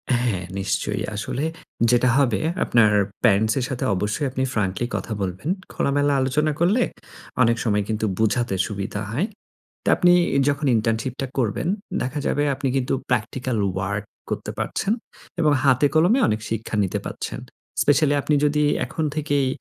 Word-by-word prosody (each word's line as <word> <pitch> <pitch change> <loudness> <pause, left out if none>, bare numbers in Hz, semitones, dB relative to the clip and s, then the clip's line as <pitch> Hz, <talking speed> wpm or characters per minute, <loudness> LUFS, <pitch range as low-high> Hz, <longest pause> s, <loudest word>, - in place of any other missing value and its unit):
হ্যাঁ, 120 -7 0 0.2
নিশ্চয়ই। 100 +1 -1
আসলে 120 +7 -2 0.5
যেটা 125 +1 +4
হবে 130 -6 +2 0.2
আপনার 115 -3 +4 0.3
প্যারেন্টস 110 -1 +4
এর 125 - -1
সাথে 130 - -3
অবশ্যই 105 +10 -1
আপনি 130 0 -1
ফ্র্যাঙ্কলি 105 +1 0
কথা 115 - -3
বলবেন। 95 - -3 0.2
খোলামেলা 145 +1 +1
আলোচনা 150 +4 +1
করলে 200 +9 +3 0.6
অনেক 115 0 +3
সময় 105 -3 +1
কিন্তু 110 0 0
বুঝাতে 110 -1 +1
সুবিধা 100 0 -4
হয়। 155 - 0 0.6
তো - - -10
আপনি 175 0 +5 0.4
যখন 145 +1 -1
ইন্টার্নশিপটা 115 +4 -1
করবেন, 120 +4 0 0.3
দেখা 130 +4 -2
যাবে 145 - +1
আপনি 135 - -2
কিন্তু 130 -1 0 0.2
প্র্যাকটিক্যাল 125 +1 -1 0.2
ওয়ার্ক 100 +2 -2 0.2
করতে - - -3
পারছেন। 205 - -1 0.5
এবং 155 -3 +4
হাতে 135 +1 +4
কলমে 180 +11 +4
অনেক 110 - 0
শিক্ষা 115 0 -3
নিতে 95 - -1
পারছেন। - - -5 0.4
স্পেশালি 145 0 +3
আপনি 150 - +1
যদি 150 0 +2 0.2
এখন 160 - -3
থেকেই 145 -3 +1
125 Hz, 145 wpm, -23 LUFS, 105-145 Hz, 0.6 s, আপনি